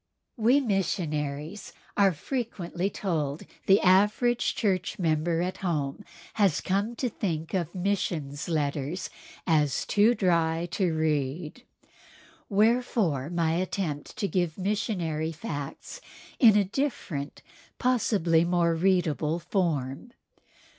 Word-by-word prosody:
We 240 +4 +4
missionaries 165 - -2 0.2
are 200 -2 +5
frequently 190 - -3
told 160 -8 -2
that - - -13 0.2
the 195 +1 +6
average 210 +6 +3
church 190 -4 0
member 165 0 +1
at 185 +1 -3
home 150 -7 -2 0.3
has 195 -7 +2
come 200 +5 -1
to 250 - -1
think 165 -8 -3
of 180 -2 -2
missionaries' 175 -6 -2
letters 150 +2 -2 0.3
as 150 -5 +2
"too 215 +4 +4
dry 170 -3 +1
to 180 -2 +1
read." 155 - -2 0.8
Wherefore, 210 - +2
my 170 -2 +1
attempt 170 -4 -3
to 205 - 0
give 175 -5 -1
missionary 180 -6 -1
facts 155 - -6 0.4
in 220 -5 +7
a 205 - +4
different, 185 - -3 0.3
possibly 200 -10 +2
more 170 -1 +2
readable, 165 -3 +1
form. 170 - -2
175 Hz, 110 wpm, -27 LUFS, 155-205 Hz, 0.8 s, in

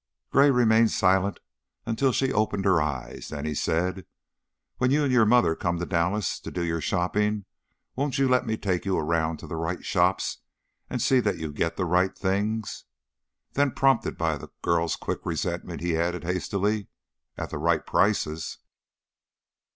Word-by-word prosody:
Gray 140 +2 +6
remained 115 -3 +4
silent 95 0 +2 0.5
until 115 +4 +1
she 135 +2 0
opened 105 -2 0
her 95 -5 +4
eyes; 70 -4 -4
then 75 -1 -5
he 75 - -1
said: 90 +4 -1 0.7
"When 125 - +3
you 145 +3 +3
and 140 - +1
your 115 -3 +5
mother 105 -9 +4
come 85 +1 -1
to 90 - -3
Dallas 90 +3 0
to - - -7
do 90 - -3
your 85 -1 -1
shopping, 105 +4 0 0.5
won't 140 0 -1
you 135 0 +3
let 125 -2 +2
me 110 0 -1
take 90 -5 -1
you 95 -1 0
around 80 0 0
to - - -10
the 80 - -5
right 80 +2 -3
shops - - +1 0.5
and - - -2
see 130 - +4
that 105 -4 0
you 80 -2 -5
get 85 +3 -1
the 95 - 0
right 90 +2 +1
things?" 105 +3 -2 0.7
Then, 140 -2 +2
prompted 135 -3 +2
by 80 -3 0
the - - -10
girl's 85 -1 +1
quick - - -4
resentment, - - -3
he 85 -1 0
added, 85 +2 -1
hastily, 100 +3 -1 0.2
" - - -51
at - - -5
the - - -4
right 80 0 +1
prices?" 85 -5 0
95 Hz, 175 wpm, -26 LUFS, 85-110 Hz, 0.7 s, Gray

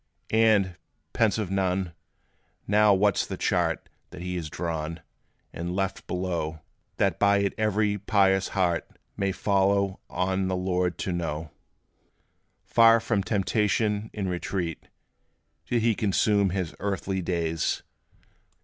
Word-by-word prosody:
And, 105 -5 +3 0.4
pensive 105 -3 +1
Nun, 95 -2 0 0.7
now 105 +1 +4
what 100 0 +3
's - - 0
the - - -5
chart - - 0 0.2
That 85 - -9
he 90 0 -3
has 85 -3 -4
drawn, 80 0 -4 0.5
and 85 +2 -4
left 95 0 -2
below, 85 -4 -3 0.4
That 95 -4 +1
by 100 0 +4
it 100 0 0
every 105 -1 +1
pious 95 -1 +3
heart 85 -3 +1 0.3
May 100 -1 0
follow 100 0 +1
on 95 +1 0
the 95 - 0
Lord 90 -2 0
to 95 - -1
know? 80 -3 -3 1.1
Far 115 0 +6
from 110 -2 0
temptation, 105 +1 0
in 100 -3 -3
retreat, 90 -2 -3 0.8
Did 120 -2 +1
he 115 -1 +4
consume 100 -1 +2
his 90 -2 -2
earthly 95 -1 -2
days? 85 -2 -1
95 Hz, 125 wpm, -26 LUFS, 90-105 Hz, 1.1 s, Far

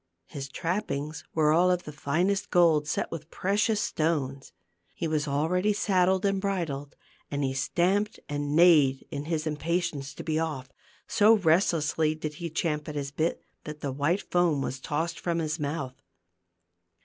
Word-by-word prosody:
His 135 +7 -7
trappings 160 -3 -3
were 155 -1 +4
all 175 +3 +4
of 180 -1 +1
the 150 - -7
finest 175 +8 0
gold, 160 -4 +4
set - - -2
with 160 -1 -7
precious 205 +4 +1
stones. 140 -7 -1 0.4
He 165 - -2
was 155 -1 0
already 175 +8 +1
saddled 190 -1 +2
and 195 -1 +1
bridled, 160 -8 -3 0.3
and 145 0 -2
he 135 -1 0
stamped 185 +10 0
and 145 0 -2
neighed 155 -6 +5
in 145 0 -4
his 160 -1 -2
im 155 -1 -2
patience 160 -5 -2
to - - -7
be 160 -1 0
off; 150 -5 -3 0.4
so 215 +2 +5
restlessly 160 -3 +2
did 155 -1 -5
he 170 - -3
champ 150 -1 -2
at 150 - -6
his 140 -1 -3
bit 160 +3 -1 0.2
that 150 0 -7
the 140 - -2
white 145 +9 0
foam 175 -5 +3
was 130 - -4
tossed 160 +5 -2
from 170 -1 -1
his 160 0 -2
mouth. 140 -3 -4
160 Hz, 165 wpm, -28 LUFS, 145-180 Hz, 0.4 s, neighed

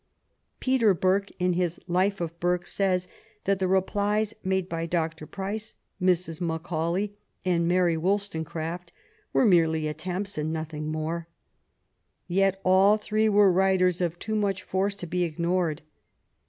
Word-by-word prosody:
'' - - -48
Peter 240 -7 +3
Burke, 190 +3 +1
in 180 0 +1
his 175 -1 -1
Life 185 +3 +1
of 170 -1 -4
Burke, 175 0 0
says 185 -2 0 0.4
that 195 0 +1
the 190 - +1
replies 205 +3 +1
made 190 -1 0
by 165 -1 -3
Dr. 160 -2 -2
Price, 205 +3 -5 0.3
Mrs. 180 -3 +1
Macaulay, 170 +4 -2 0.3
and 170 -2 +2
Mary 175 -1 +3
Wollstonecraft 170 -2 -2 0.4
were - - +3
merely 160 -5 +3
attempts 180 +4 -4
and 155 +1 -1
nothing 155 -1 -4
more. 160 +2 -3 1.0
Yet 195 +1 +2
all 190 +3 +5
three 215 +1 +1
were 205 -2 +5
writers 185 -1 +3
of 175 -1 -1
too 220 +4 -4
much 200 -3 0
force 195 +2 -1
to 200 - -6
be 180 +2 -2
ignored. 170 -1 -1
180 Hz, 140 wpm, -27 LUFS, 165-195 Hz, 1.0 s, all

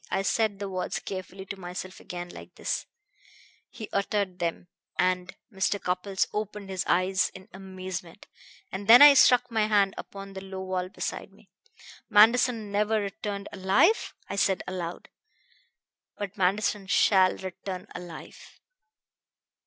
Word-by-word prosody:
I 195 - 0
said 215 0 +1
the 200 0 -4
words 185 -1 -3
carefully 190 0 -7
to 195 0 -7
myself 180 +1 -7
again, 175 0 -7
like - - -12
this - - -3 0.4
" - - -25 0.3
he 220 - -8
uttered 200 -2 -1
them, 170 +1 -3 0.3
and 180 0 0 0.2
Mr. 195 +1 0
Cupples 185 +2 -1
opened 210 -2 -4
his 190 0 -1
eyes 185 +2 +2
in 190 +1 -12
amazement 185 -1 -7 0.5
"and 195 +1 -6
then 240 +5 +10
I 290 -1 +11
struck 250 -2 +5
my 220 -2 +2
hand 200 -2 +3
upon 195 0 -9
the 190 - -7
low 190 0 -7
wall 185 -1 -2
beside - - -5
me. - - -23 0.6
'Manderson 225 0 +4
never 210 +2 +1
returned 200 0 -4
alive?' 200 - +2
I - - -5
said 195 -1 +2
aloud. 180 -2 -5 1.1
'But 200 -1 -5
Manderson 200 +1 0
shall 190 -1 +4
return 185 0 -6
alive!' 175 -2 -11
195 Hz, 140 wpm, -27 LUFS, 185-205 Hz, 1.1 s, I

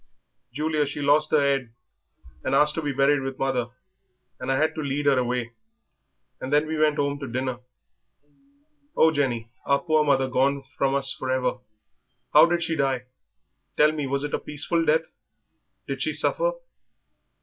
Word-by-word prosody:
Julia, 150 +2 -1
she 145 - -5
lost 145 +2 +3
her 155 - +3
'ead 135 -5 -1 0.7
and 135 - 0
asked 150 +1 +5
to 160 - -3
be 145 -2 -2
buried 140 +1 +2
with 135 0 -5
mother, 130 -3 -1 0.7
and 125 +1 -3
I 135 - +1
had 155 +2 +1
to 155 - -5
lead 145 0 -2
her 140 -2 +4
away; 125 -1 -2 0.9
and 130 - -6
then 150 +1 +3
we 155 0 -3
went 155 -1 +2
'ome 140 0 -1
to 140 - -6
dinner." 130 0 -3 1.4
"Oh, 160 - +5
Jenny, 125 -6 -1 0.2
our 140 - +2
poor 155 -2 +2
mother 135 -3 +2
gone 135 +2 +1
from 135 0 +1
us 135 -1 +1
for 130 - -6
ever! 130 -1 0 0.7
How - - +8
did 170 0 0
she 165 -1 -1
die? 135 -4 0 0.7
Tell 150 +1 +5
me, 150 -3 -3
was 140 +1 -1
it 145 - -4
a - - 0
peaceful 155 +3 -1
death? 160 +1 +2 0.8
Did - - -4
she - - 0
suffer?" - - +1
140 Hz, 170 wpm, -25 LUFS, 130-150 Hz, 1.4 s, How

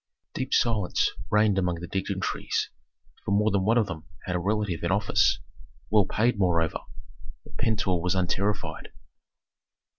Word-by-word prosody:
Deep 130 0 -3
silence 110 -6 +2 0.2
reigned 105 -2 +3
among 90 -2 0
the 85 +1 -6
dignitaries, 95 +1 -2 0.5
for - - -5
more 105 +2 +3
than 100 -1 +1
one 115 +5 +3
of 115 - +4
them 80 -5 -7 0.2
had 90 - -2
a - - +1
relative 100 -2 -1
in 85 - -1
office, 100 0 +3 0.5
well 105 -3 +4
paid 115 +1 +1
moreover. 85 -4 +2 0.6
But - - -14
Pentuer 95 -6 +1
was 90 +2 0
unterrified. 95 +2 -1
100 Hz, 145 wpm, -27 LUFS, 90-105 Hz, 0.6 s, of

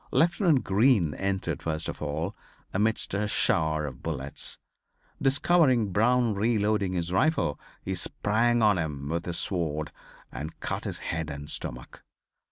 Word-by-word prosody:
Lieutenant 170 - +3
Green 100 - +3
entered 95 0 -2
first 80 0 -2
of - - -6
all 75 +6 -2 0.4
amidst 110 +2 0
a 105 +1 0
shower 80 -6 +1
of 65 -3 -7
bullets. 70 -4 -4 0.6
Discovering 135 - +3
Brown 120 +3 +3
reloading 105 -2 +1
his 85 -1 -2
rifle 155 - +2 0.2
he - - -2
sprang 115 +3 +1
on 105 -4 +4
him 70 -3 -3
with 85 +1 -2
his 85 -1 -1
sword 80 -4 -1 0.4
and 80 +3 -7
cut - - -3
his - - -3 0.2
head 80 -2 -2
and 70 +1 -6
stomach. - - -5
95 Hz, 140 wpm, -28 LUFS, 80-115 Hz, 0.6 s, on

